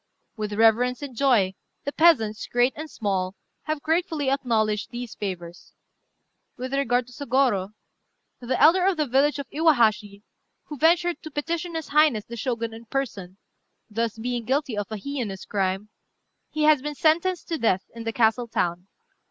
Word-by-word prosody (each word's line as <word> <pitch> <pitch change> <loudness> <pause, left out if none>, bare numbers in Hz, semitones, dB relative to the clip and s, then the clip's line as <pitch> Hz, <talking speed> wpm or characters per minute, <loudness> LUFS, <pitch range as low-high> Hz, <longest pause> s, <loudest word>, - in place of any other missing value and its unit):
With 210 -2 -4
reverence 230 +5 +3
and 270 -4 -7
joy 225 -8 +3 0.3
the 285 - -3
peasants, 255 -11 +3
great 245 +2 +2
and 310 +1 -7
small, 195 -5 -2 0.3
have 310 -2 -3
gratefully 320 -4 0
acknowledged 220 -6 0
these 240 -2 -6
favours. 175 -4 -7 0.8
With 255 +2 -5
regard 250 -3 +1
to 250 - -16
Sôgorô, 245 -7 0 0.6
the 250 +1 -2
elder 335 +5 +6
of 385 -3 +2
the 305 - +1
village 280 +3 +2
of 280 - -5
Iwahashi, 220 - +2 0.4
who 295 - -8
ventured 345 +2 +3
to 315 - -8
petition 330 +3 -3
his 320 -2 -4
highness 290 -8 +3
the 235 - -8
Shogun 230 -1 -3
in 225 +1 -11
person, 210 -8 -4 0.5
thus 225 +1 -2
being 240 +1 -3
guilty 265 0 -1
of 205 0 -4
a 215 - -3
heinous 225 -5 -5
crime, 195 +1 -2 0.6
he 305 - -2
has 300 -3 +5
been 295 +1 -4
sentenced 340 +4 +1
to 330 - -2
death 190 -5 +2
in 230 0 -8
the 225 - -2
castle 230 +1 +2
town. 175 -4 -2
245 Hz, 160 wpm, -25 LUFS, 215-295 Hz, 0.8 s, elder